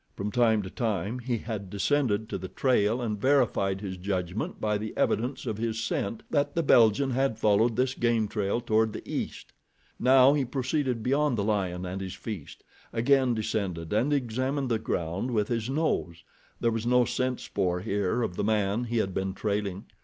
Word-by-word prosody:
From 100 +1 -3
time 110 -3 +3
to 95 - -6
time 110 0 -2
he 120 -1 -2
had 105 -4 -5
descended 110 +1 +1
to - - -3
the 95 - -6
trail 120 0 +1
and 105 -3 -3
verified 100 -8 +2
his 95 -3 -5
judgment 90 +1 -3
by 105 -1 0
the 110 +1 -6
evidence 125 +5 0
of 110 -3 -3
his 115 -1 -1
scent 110 0 -2
that 145 -1 +1
the 165 - +1
Belgian 120 0 +4
had 130 -3 +1
followed 110 +2 +3
this 130 +2 +1
game 115 -3 +1
trail 105 +2 -1
toward 110 -2 +1
the - - -8
east. - - -5 0.5
Now 130 +1 +6
he 145 -2 +1
proceeded 130 -1 -1
beyond 140 0 +2
the 100 - 0
lion 95 -4 -1
and 95 +2 -4
his 95 -1 -5
feast, 105 -10 -7 0.3
again 130 +1 +3
descended 95 -6 -2
and 125 +7 +2
examined 130 +1 -1
the 115 -2 +1
ground 90 +3 -2
with 105 -4 0
his 115 -1 -1
nose. 135 - -1 0.4
There 115 - +2
was 115 +1 -2
no 125 0 +4
scent 130 0 -1
spoor 90 -3 -1
here 100 +3 0
of 90 -5 -3
the - - 0
man 105 +2 +1
he 120 0 -2
had 95 -4 0
been 95 0 -2
trailing. 100 -2 -2
110 Hz, 185 wpm, -28 LUFS, 100-125 Hz, 0.5 s, Now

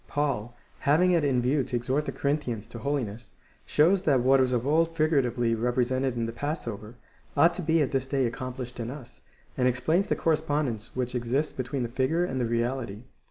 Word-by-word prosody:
Paul, 125 -6 -2 0.2
having 165 +6 +3
it 170 -3 +3
in 130 -4 +2
view 135 +3 +2
to 125 - -4
exhort 130 +5 -1
the - - -1
Corinthians 140 -7 -2
to 115 +1 -9
holiness, 115 -5 -3 0.3
shows 175 +6 +4
that 140 -7 +3
what 135 +2 +5
was 130 -1 +2
of 120 -1 0
old 165 +3 +2
figuratively 125 -7 +2
represented 125 +2 0
in 115 -1 -1
the 115 - -3
passover, 115 -5 -5 0.4
ought 165 +4 +6
to 180 - -5
be 160 -1 +3
at 140 - -2
this 135 -2 -1
day 135 -1 +1
accomplished 125 +1 -5
in 115 0 -3
us, 130 -2 -10 0.3
and 125 - +2
explains 145 +10 +1
the - - +1
cor 165 - +2
respondence 145 -8 -2
which 125 -1 -2
exists 125 +5 -1
between 130 +1 -3
the - - -1
figure 130 +8 0
and 130 -6 -2
the - - +1
reality. 115 -2 -2
130 Hz, 200 wpm, -27 LUFS, 120-150 Hz, 0.4 s, ought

